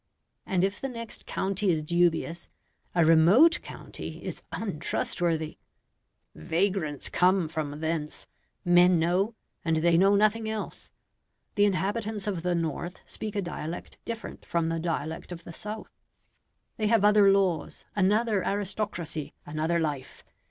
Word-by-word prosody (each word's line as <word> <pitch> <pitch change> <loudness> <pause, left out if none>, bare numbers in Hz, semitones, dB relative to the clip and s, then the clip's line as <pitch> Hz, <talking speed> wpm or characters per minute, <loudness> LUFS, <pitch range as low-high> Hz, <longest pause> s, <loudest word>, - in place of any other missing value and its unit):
And 185 -2 +1
if 195 +1 -1
the 270 - -2
next 230 -2 -8
county 195 +1 0
is 160 -3 +1
dubious, 170 +1 +1 0.5
a 170 -2 +5
remote 180 - +6
county - - -8
is - - -5
untrustworthy. 165 -3 -2 0.7
"Vagrants 160 - -1
come 180 -1 +3
from 150 -2 -4
thence," 160 -2 -1 0.4
men 175 0 +6
know, 180 +7 +1 0.3
and 165 -1 +1
they 170 +1 +4
know 195 +2 +5
nothing 215 +2 +2
else. 220 -1 -5 0.6
The 205 -1 +4
inhabitants 205 +2 -1
of 195 -5 -2
the 180 0 0
north 170 +1 -3
speak 215 -1 -5
a 200 - 0
dialect 170 -1 -6
different 230 -1 -6
from 165 -1 0
the 165 0 -1
dialect 160 0 -3
of 175 -1 -7
the 170 - -9
south: 215 +5 -7 0.9
they 215 - +1
have 220 -2 +4
other 210 -1 +6
laws, 190 -5 0
another 210 +1 +2
aristocracy, 195 -6 -2
another 155 +3 0
life. 145 -5 -4
180 Hz, 135 wpm, -28 LUFS, 165-205 Hz, 0.9 s, remote